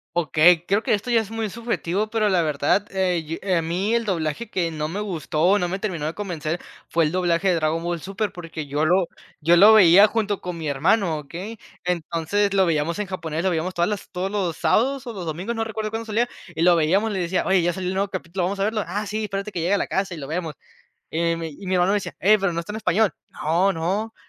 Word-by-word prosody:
Okey, 170 Hz, +1 st, +4 dB
creo 200 Hz, +3 st, +1 dB
que -, -, +1 dB
esto 210 Hz, +4 st, -2 dB
ya 230 Hz, -2 st, +4 dB
es 220 Hz, 0 st, -9 dB
muy 225 Hz, -2 st, -2 dB
subjetivo, 215 Hz, -3 st, -2 dB
pero 215 Hz, -2 st, +1 dB
la 185 Hz, -3 st, +3 dB
verdad, 150 Hz, +6 st, +1 dB
eh, 185 Hz, -3 st, +1 dB
y, 165 Hz, +2 st, -5 dB
eh, 190 Hz, -2 st, 0 dB
a 165 Hz, -, +2 dB
mí 185 Hz, +7 st, -1 dB
el 235 Hz, -, +1 dB
doblaje 180 Hz, +2 st, -2 dB
que 170 Hz, -3 st, -1 dB
no 155 Hz, -1 st, -3 dB
me 195 Hz, +5 st, -4 dB
gustó, 180 Hz, -1 st, +1 dB
no 175 Hz, -3 st, -1 dB
me 190 Hz, +2 st, -3 dB
terminó 175 Hz, -8 st, -3 dB
de 160 Hz, -, -2 dB
convencer, 175 Hz, -4 st, -3 dB, 0.3 s
fue 165 Hz, -1 st, +2 dB
el 150 Hz, -, -2 dB
doblaje 180 Hz, 0 st, +1 dB
de 180 Hz, -, +4 dB
Dragon 160 Hz, +1 st, 0 dB
Ball 170 Hz, -2 st, -3 dB
Super, 200 Hz, +1 st, -3 dB
porque 165 Hz, -4 st, -7 dB
yo 145 Hz, +2 st, -1 dB
lo 180 Hz, +3 st, +3 dB, 0.3 s
yo 170 Hz, +3 st, +4 dB
lo 205 Hz, +5 st, +8 dB
veía 200 Hz, -1 st, +8 dB
junto 210 Hz, -3 st, -1 dB
con 180 Hz, -2 st, -5 dB
mi 160 Hz, -2 st, -4 dB
hermano, 160 Hz, +4 st, +2 dB
¿okey? 180 Hz, +10 st, -8 dB, 0.3 s
Entonces, 180 Hz, +4 st, 0 dB
lo 190 Hz, -1 st, +4 dB
veíamos 165 Hz, +3 st, 0 dB
en 205 Hz, -, -2 dB
japonés, 165 Hz, -3 st, -4 dB
lo 185 Hz, -, +2 dB
veíamos 175 Hz, +3 st, -1 dB
todas 175 Hz, 0 st, +1 dB
las 205 Hz, -2 st, -4 dB
todos 185 Hz, +2 st, -2 dB
los 190 Hz, -6 st, -2 dB
sábados 250 Hz, +10 st, +1 dB
o 235 Hz, -, -5 dB
los 185 Hz, -4 st, -6 dB
domingos, 180 Hz, +9 st, -3 dB
no 225 Hz, -, -1 dB
recuerdo 220 Hz, -1 st, -4 dB
cuándo 225 Hz, 0 st, -4 dB
salía, 225 Hz, +3 st, 0 dB, 0.3 s
y 160 Hz, -, -4 dB
lo 175 Hz, 0 st, +6 dB
veíamos 185 Hz, +8 st, +2 dB
y -, -, -3 dB
le 190 Hz, -, -2 dB
decía: 180 Hz, +1 st, 0 dB
"Oye, 190 Hz, -2 st, +3 dB
ya 175 Hz, +1 st, +1 dB
salió 185 Hz, 0 st, -4 dB
el 185 Hz, -, -1 dB
nuevo 195 Hz, +1 st, 0 dB
capítulo, 185 Hz, -1 st, -4 dB
vamos 195 Hz, +2 st, -2 dB
a 195 Hz, -, +2 dB
verlo", 215 Hz, -1 st, -1 dB
"Ah, 205 Hz, +5 st, -3 dB
sí, 215 Hz, +1 st, -3 dB
espérate 200 Hz, 0 st, -4 dB
que 170 Hz, -, -2 dB
llegue 180 Hz, +4 st, +1 dB
a -, -, +1 dB
la -, -, -1 dB
casa 190 Hz, -2 st, -1 dB
y -, -, -7 dB
lo 135 Hz, -2 st, -7 dB
vemos". 160 Hz, -1 st, -3 dB, 0.6 s
Eh, 170 Hz, +1 st, +1 dB
y -, -, -2 dB
mi 165 Hz, -1 st, -4 dB
y 185 Hz, +6 st, -11 dB
mi 185 Hz, -, 0 dB
hermano 180 Hz, +2 st, +3 dB
me 205 Hz, -, +3 dB
decía: 180 Hz, -4 st, -4 dB
"Eh, 210 Hz, +4 st, +5 dB
pero, 195 Hz, -2 st, 0 dB
¿no 170 Hz, -, -2 dB
está 170 Hz, -, -9 dB
en 215 Hz, -, -4 dB
español?", 215 Hz, -2 st, +2 dB, 0.2 s
"No, 175 Hz, +6 st, +1 dB
no", 195 Hz, +7 st, -2 dB
185 Hz, 260 wpm, -23 LUFS, 165-205 Hz, 0.6 s, lo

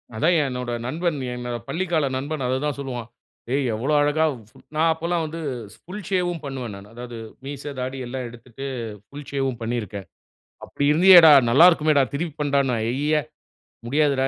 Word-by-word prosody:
அதான் 165 Hz, +10 st, +3 dB
என்னோட 125 Hz, -2 st, -4 dB
நண்பன், 160 Hz, +4 st, -1 dB, 0.2 s
என்னோட 125 Hz, -1 st, -4 dB
பள்ளிக்கால 165 Hz, -5 st, 0 dB
நண்பன் 145 Hz, 0 st, -3 dB
அது 130 Hz, +1 st, +1 dB
தான் 145 Hz, -2 st, -2 dB
சொல்லுவான். 125 Hz, -4 st, -5 dB, 0.5 s
ஏய் 140 Hz, 0 st, +1 dB
எவ்வளோ 125 Hz, +8 st, -1 dB
அழகா, 150 Hz, +2 st, +2 dB, 0.3 s
சு -, -, -36 dB, 0.2 s
நான் 160 Hz, +1 st, +3 dB
அப்போல்லாம் 170 Hz, +1 st, -1 dB
வந்து 160 Hz, +2 st, -6 dB, 0.3 s
ஷ் -, -, -17 dB
புல் 190 Hz, +1 st, -7 dB
ஷேவ்வும் 175 Hz, -3 st, 0 dB
பண்ணுவேன் 130 Hz, -5 st, -5 dB
நானு. 100 Hz, +1 st, -12 dB
அதாவது 120 Hz, -1 st, -8 dB, 0.3 s
மீச, 140 Hz, 0 st, -6 dB, 0.2 s
தாடி 130 Hz, +1 st, -3 dB
எல்லாம் 125 Hz, +1 st, -5 dB
எடுத்துட்டு 120 Hz, +3 st, -10 dB, 0.4 s
புல் 145 Hz, 0 st, -10 dB
ஷேவ்வும் 135 Hz, -4 st, -1 dB
பண்ணியிருக்கேன். 110 Hz, -4 st, -4 dB, 0.6 s
அப்டி 140 Hz, -, -3 dB
இருந்தீயேடா, 170 Hz, -1 st, +9 dB, 0.2 s
நல்லா 150 Hz, +9 st, +8 dB
இருக்குமேடா, 155 Hz, -4 st, +3 dB
திருப்பி 155 Hz, +1 st, -3 dB
பண்ணுடாண்னா. 140 Hz, -3 st, +1 dB
ஐய்யிய! 145 Hz, +5 st, +1 dB, 0.7 s
முடியாதுடா. 140 Hz, 0 st, +2 dB
140 Hz, 155 wpm, -23 LUFS, 125-160 Hz, 0.7 s, இருந்தீயேடா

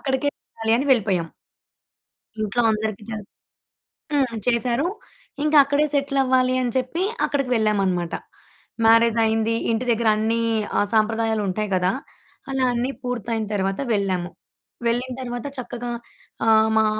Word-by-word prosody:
అక్కడికే 270 Hz, +1 st, 0 dB, 0.2 s
వెళ్ళాలి 225 Hz, 0 st, -2 dB
అని 275 Hz, -, -1 dB
వెళ్ళిపోయాం. 195 Hz, -8 st, +1 dB, 1.1 s
ఇంట్లో 215 Hz, +3 st, 0 dB
అందరికి 215 Hz, -1 st, -2 dB
తెలుసు. 210 Hz, -2 st, -6 dB, 0.8 s
హ్మ్. 285 Hz, -2 st, +3 dB
ఆహ్, -, -, -3 dB
చేశారు. 245 Hz, +5 st, +1 dB, 0.6 s
ఇంక 305 Hz, 0 st, 0 dB
అక్కడే 285 Hz, +2 st, +2 dB
సెటిలవ్వాలి 265 Hz, -2 st, +2 dB
అని 245 Hz, -1 st, -1 dB
చెప్పి, 260 Hz, +8 st, -1 dB, 0.2 s
అక్కడికి 275 Hz, -3 st, -1 dB
వెళ్ళామనమాట. 195 Hz, -6 st, +1 dB, 0.7 s
మ్యారేజయింది. 225 Hz, 0 st, +4 dB, 0.2 s
ఇంటి 230 Hz, +2 st, -1 dB
దెగ్గరన్నీ 225 Hz, 0 st, +2 dB, 0.4 s
ఆహ్, 205 Hz, -, +2 dB
సాంప్రదాయాలుంటాయి 215 Hz, -2 st, +1 dB
గదా! 180 Hz, 0 st, +2 dB, 0.6 s
అలా 270 Hz, -1 st, 0 dB
అన్నీ 245 Hz, +3 st, -1 dB
పూర్తయిన 235 Hz, -3 st, -2 dB
తర్వాత 195 Hz, -1 st, -1 dB
వెళ్ళాము. 190 Hz, -4 st, 0 dB, 0.6 s
వెళ్ళిన 245 Hz, +2 st, 0 dB
తర్వాత 245 Hz, -1 st, -5 dB
చక్కగా 245 Hz, -1 st, -5 dB, 0.5 s
ఆహ్, 220 Hz, 0 st, +5 dB
మా 220 Hz, -, +5 dB
230 Hz, 115 wpm, -23 LUFS, 215-255 Hz, 1.1 s, ఆహ్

